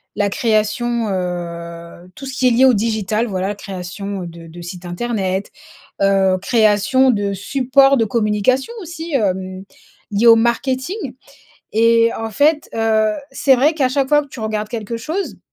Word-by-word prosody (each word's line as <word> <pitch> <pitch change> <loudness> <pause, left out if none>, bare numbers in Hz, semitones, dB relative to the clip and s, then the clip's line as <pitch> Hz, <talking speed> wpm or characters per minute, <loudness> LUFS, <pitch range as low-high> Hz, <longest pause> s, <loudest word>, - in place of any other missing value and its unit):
la 205 -1 +1
création, 230 +1 0
heu, 170 -1 -5
tout 275 - -9
ce 265 - -6
qui 255 - +2
est - - +4
lié 250 +3 +5
au 260 - +6
digital, 220 +1 0
voilà, 190 -1 -2
la 205 - -3
création, 195 0 -6
heu, - - -6
de 170 0 -11
de 170 +2 -11
sites 175 +1 -8
internet, 190 0 -2 0.5
heu, 195 -1 +3
création 220 +4 +3
de 205 -3 -1
support 270 +6 +3
de 225 - +2
communication 220 - 0
aussi, 330 -1 -7
hem, 190 -5 -1 0.5
lié 210 +3 +1
au 230 - +9
marketing 260 - 0 0.8
et 230 +1 +4
en 225 0 -4
fait, 300 +7 +2
heu, 220 -1 +2 0.2
c'est 270 -2 +3
vrai 295 +6 +3
qu'à 270 -5 +1
chaque 270 0 0
fois 295 0 +5
que - - -16
tu 260 - -10
regardes 215 -1 -3
quelque 230 -1 -4
chose, 320 +12 -4
220 Hz, 165 wpm, -18 LUFS, 195-255 Hz, 0.8 s, au